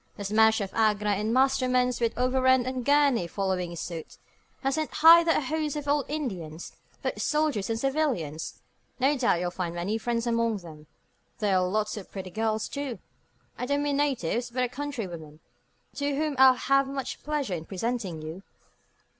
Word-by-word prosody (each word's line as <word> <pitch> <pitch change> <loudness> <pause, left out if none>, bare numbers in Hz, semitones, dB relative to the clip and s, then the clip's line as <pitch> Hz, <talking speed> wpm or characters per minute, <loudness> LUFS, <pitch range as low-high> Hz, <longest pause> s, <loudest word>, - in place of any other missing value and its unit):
The 205 - -5
smash 220 +2 +4
of 195 -1 -4
Agra 210 -2 +2
and 210 +2 0
Masterman's, 255 -1 +2
with 230 -1 0
Overend 260 0 +3
and 255 -1 -3
Gurney 280 -8 +3
following 180 -2 -2
suite, 170 -1 -7 0.5
has 270 0 +1
sent 310 +1 -1
hither 335 +1 +9
a 325 - +3
host 305 +1 -2
of 295 -1 -5
old 285 -2 +2
Indians, 185 - -5 0.3
both - - -2
soldiers 300 -10 0
and 225 0 -1
civilians. 255 - -2 0.4
No 275 +3 +3
doubt 250 -9 +2
you'll 175 0 -2
find 175 -2 -4
many 195 +6 -2
friends 235 +1 -1
among 230 -2 +1
them. 155 -5 -12 0.5
There 205 -4 +1
are 185 0 +2
lots 215 +3 -1
of 200 - -8
pretty 190 -2 -7
girls, 220 +1 -1
too 280 -4 -4 0.6
I 250 - -2
don't 285 +1 +1
mean 290 -1 0
natives, 250 - 0
but 250 +2 -1
our 250 - 0
countrywomen 195 - -6 0.6
to 285 0 -1
whom 305 0 -1
I'll 260 -1 +8
have 275 +1 +2
much 270 -1 -5
pleasure 295 -9 -2
in 165 -2 -4
presenting 195 -5 -3
you." 160 +4 -7
235 Hz, 170 wpm, -27 LUFS, 190-275 Hz, 0.6 s, hither